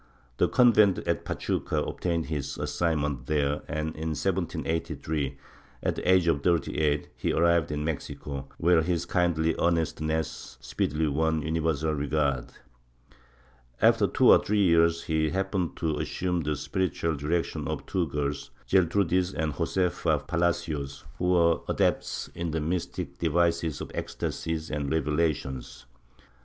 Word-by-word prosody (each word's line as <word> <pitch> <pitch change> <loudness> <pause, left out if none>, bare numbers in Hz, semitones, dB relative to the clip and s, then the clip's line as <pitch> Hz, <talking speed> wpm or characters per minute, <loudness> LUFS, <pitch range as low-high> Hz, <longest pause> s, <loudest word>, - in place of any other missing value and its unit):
The - - +3
convent 110 -6 +5
at - - 0
Pachuca - - -1
obtained 85 -3 -2
his 75 -4 -4
assignment 75 -6 -1
there 75 -1 +1
and 75 0 -2
in 80 0 -3
1783, 80 -4 -2 0.5
at - - 0
the 90 - +1
age 90 -2 +4
of 70 -4 +2
38, 75 -3 +1
he - - -1
arrived 85 -2 +3
in 75 0 -2
Mexico, 70 -3 -4
where 85 -1 +4
his 85 0 -1
kindly 80 -2 +1
earnestness 80 -2 -1
speedily 80 +2 -1
won 80 +1 +1
universal 80 -1 0
regard. 70 -3 0 1.3
After - - +4
two - - +5
or - - +6
three 105 0 +2
years 85 -1 +4
he 80 -1 +1
happened 95 0 -1
to 80 -2 -1
assume 90 -1 -1
the 75 -1 -1
spiritual 85 0 -1
direction 75 +4 -2
of - - -4
two 90 -3 0
girls, 70 0 -3 0.2
Gertrudis 95 0 +2
and 80 -2 -1
Josefa 90 +5 0
Palacios, 80 -5 -1 0.2
who 90 - -1
were 85 -2 +4
adepts - - 0
in 85 0 -3
the 80 +1 -1
mystic 85 +3 -3
devices 85 -1 +1
of - - -6
ecstasies 80 0 -3
and 75 -2 -2
revelations. 75 -4 -1
80 Hz, 130 wpm, -27 LUFS, 75-85 Hz, 1.3 s, or